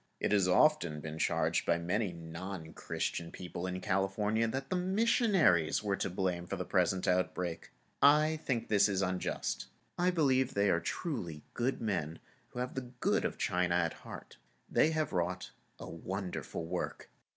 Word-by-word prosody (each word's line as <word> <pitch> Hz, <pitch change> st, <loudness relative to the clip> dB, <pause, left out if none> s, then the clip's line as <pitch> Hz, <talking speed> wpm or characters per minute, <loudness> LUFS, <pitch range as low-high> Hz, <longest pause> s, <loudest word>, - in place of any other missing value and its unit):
It -, -, 0 dB
has 100 Hz, -3 st, +4 dB
often 90 Hz, -, +3 dB
been 80 Hz, +1 st, -6 dB
charged -, -, +1 dB
by 85 Hz, -, +3 dB
many 90 Hz, +4 st, -1 dB
non 85 Hz, 0 st, -7 dB
Christian 85 Hz, -1 st, -3 dB
people 90 Hz, 0 st, -5 dB
in 90 Hz, 0 st, -3 dB
California 105 Hz, +3 st, +1 dB
that 135 Hz, +4 st, -4 dB
the -, -, +2 dB
missionaries 185 Hz, -, +3 dB
were 100 Hz, -2 st, +1 dB
to -, -, -1 dB
blame 90 Hz, -1 st, -2 dB
for -, -, -2 dB
the -, -, -4 dB
present 95 Hz, 0 st, +1 dB
outbreak. 90 Hz, -2 st, 0 dB, 0.3 s
I 150 Hz, +2 st, +5 dB
think 120 Hz, -4 st, -1 dB
this 100 Hz, -1 st, +4 dB
is 95 Hz, -1 st, +1 dB
unjust. 90 Hz, -1 st, -2 dB, 0.3 s
I 180 Hz, +1 st, +4 dB
believe 135 Hz, -7 st, +2 dB
they 100 Hz, -1 st, +3 dB
are 85 Hz, -, +3 dB
truly 85 Hz, -, -4 dB
good 125 Hz, +3 st, -1 dB
men 85 Hz, -7 st, -1 dB, 0.3 s
and 125 Hz, -, -6 dB
have 125 Hz, 0 st, -2 dB
the 130 Hz, -2 st, -5 dB
good -, -, +2 dB
of -, -, -2 dB
China 90 Hz, -1 st, +1 dB
at 85 Hz, -2 st, +1 dB
heart. -, -, -11 dB, 0.3 s
They 155 Hz, -, +3 dB
have 155 Hz, -5 st, -1 dB
wrought 90 Hz, +1 st, -1 dB, 0.3 s
a -, -, -8 dB
wonderful 90 Hz, -1 st, -5 dB
work. -, -, -4 dB
95 Hz, 165 wpm, -33 LUFS, 85-130 Hz, 0.3 s, I